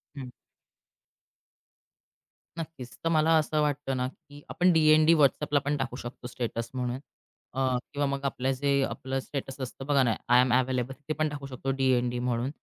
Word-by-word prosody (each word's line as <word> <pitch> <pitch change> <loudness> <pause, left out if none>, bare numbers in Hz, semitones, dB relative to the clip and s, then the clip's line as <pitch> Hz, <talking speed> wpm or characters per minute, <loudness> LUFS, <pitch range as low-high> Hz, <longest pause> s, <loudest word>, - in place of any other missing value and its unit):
हं. 135 -3 -7 2.3
नक्कीच. 155 -7 -7
तर 165 - +1
मला 160 +1 +4
असं 155 0 +1
वाटतं 145 -2 -1
ना, 125 0 0
की 145 +2 -14
आपण 180 0 +3
डी-एन-डी 155 0 +6
WhatsAppला 145 +1 +3
पण 145 +1 0
टाकू 130 -2 -3
शकतो, 125 -1 -8
स्टेटस 115 -1 -4
म्हणून. 125 0 -2 0.5
अ, 130 - -3 0.3
किंवा 145 0 0
मग 140 0 -3
आपलं, 135 -1 0
जे 140 +1 +1
आपलं 135 0 -3
स्टेटस 135 0 -6
असतं, 130 +1 -6
बघा 140 -2 +3
ना. 115 -4 +2
आय 125 +1 +7
एम 125 -1 +2
अवेलेबल 130 0 +1 0.2
ते - - +2
पण 155 - +2
टाकू 145 -1 -7
शकतो. 135 +1 -3
डी-एन-डी 125 -2 +2
म्हणून 120 +2 0
135 Hz, 165 wpm, -28 LUFS, 125-145 Hz, 2.3 s, आय